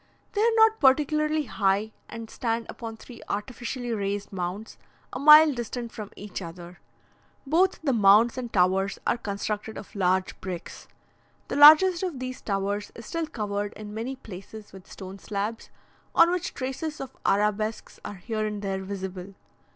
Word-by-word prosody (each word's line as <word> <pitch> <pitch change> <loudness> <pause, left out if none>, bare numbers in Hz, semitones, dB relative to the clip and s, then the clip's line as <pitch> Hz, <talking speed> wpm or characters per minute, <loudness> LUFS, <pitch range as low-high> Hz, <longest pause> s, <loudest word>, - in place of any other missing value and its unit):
They 410 - 0
are 460 - +5
not 445 0 +5
particularly 305 +3 +3
high, 205 -3 0 0.2
and 230 0 -7
stand 230 0 -2
upon 225 -1 -7
three 235 +1 -13
artificially 240 +3 -4
raised 200 -1 -3
mounds, 185 +4 -5 0.3
a 255 - -4
mile 300 +1 +8
distant 240 -1 -5
from 210 -2 -8
each 205 -1 -7
other. 175 0 -10 0.7
Both 355 +7 +2
the 275 -4 +1
mounds 215 +2 +5
and 245 -3 -5
towers 190 +1 +2
are - - +2
constructed 210 0 -4
of - - -10
large 185 -1 0
bricks. 180 -3 -7 0.6
The - - -2
largest 315 +5 +8
of 360 -7 -3
these 255 0 -6
towers 200 0 -2
is 230 - -10
still 330 +4 -3
covered 205 -6 -3
in 210 -1 -9
many 235 +5 -4
places 210 -2 -11
with 190 -1 -14
stone 190 +1 -9
slabs, 210 +3 -4 0.5
on 335 +1 +6
which 355 -1 -3
traces 280 +4 -4
of 270 - -7
arabesques 210 +2 0
are 205 - -6
here 215 +3 -4
and 210 -1 -4
there 195 -1 -2
visible. 190 -1 -6
220 Hz, 160 wpm, -26 LUFS, 200-265 Hz, 0.7 s, mile